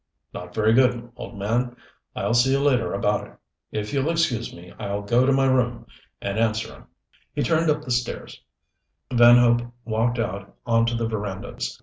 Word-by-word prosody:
"Not 90 0 -8
very 110 0 +3
good, 120 -1 +2
old 115 - -9
man. 120 +5 -1 0.4
I'll - - -1
see 120 +3 +4
you 135 - +2
later 135 -5 +2
about - - 0
it. - - -20 0.3
If 105 +3 -4
you'll 140 +2 +1
excuse 155 -9 0
me 90 +1 -13
I'll 100 +1 -3
go 120 +5 +3
to - - +4
my 135 0 +3
room 120 -3 +1 0.3
and 100 +2 -3
answer 110 -1 0
'em." - - -16 0.5
He - - 0
turned 160 +5 +2
up 150 0 +1
the 130 - -6
stairs 120 0 -3 0.7
Van 120 0 +8
Hope 120 -1 +4 0.2
walked 115 +2 0
out 100 -4 -4
onto 115 0 +2
the 115 -1 -1
verandas. 100 - -5
120 Hz, 180 wpm, -24 LUFS, 110-125 Hz, 0.7 s, Van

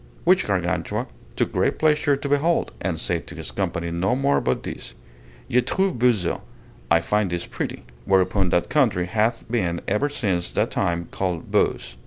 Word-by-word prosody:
Which - - +4
Gargantua - - -1 0.3
took - - 0
great - - +1
pleasure 150 -2 +3
to 140 - -4
behold, 145 +4 +2
and 85 -4 -1
said 85 0 -2
to 80 - -7
his 80 -2 -6
company 85 0 -2
no 90 +7 +1
more 140 +2 +2
but 65 - -1
this: - - -7 0.5
Je 125 - +3
trouve 190 +3 0
beau 125 +1 +6
ce 95 -7 -2 0.5
(I 85 - +5
find 105 +3 +1
this 85 0 -2
pretty); - - -5 0.2
whereupon 95 0 +2
that 85 - +1
country 115 -12 +2
hath 110 +4 0
been 95 -8 0
ever 105 +9 +1
since 95 -11 -1
that - - +1
time 85 0 -1
called 90 -4 -3
Beauce. - - 0
100 Hz, 175 wpm, -23 LUFS, 85-130 Hz, 0.5 s, beau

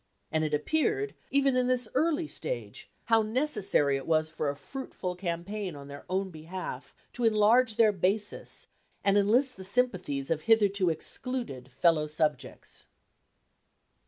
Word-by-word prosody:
And 155 0 +1
it 155 - -1
appeared, 315 - 0 0.2
even 275 -1 +2
in 250 -1 +2
this 250 -2 0
early 315 +3 +1
stage, - - -5 0.2
how 225 -1 +4
necessary 215 - +2
it 135 - -8
was 155 -1 +1
for 155 -2 -2
a 140 - -3
fruitful 180 - -6
campaign 180 +1 -4
on 140 0 -10
their 140 0 -10
own 190 +1 -1
behalf 170 +3 -7 0.2
to 245 - -4
enlarge 225 +2 +4
their 225 -2 +5
basis, 205 +2 0 0.4
and 200 0 +3
enlist 235 +6 +3
the 190 - -8
sympathies 185 - 0
of 160 -1 0
hitherto 200 -2 +3
excluded 165 - -3
fellow 155 +2 +2
subjects. 150 -4 -3
200 Hz, 140 wpm, -29 LUFS, 155-250 Hz, 0.4 s, their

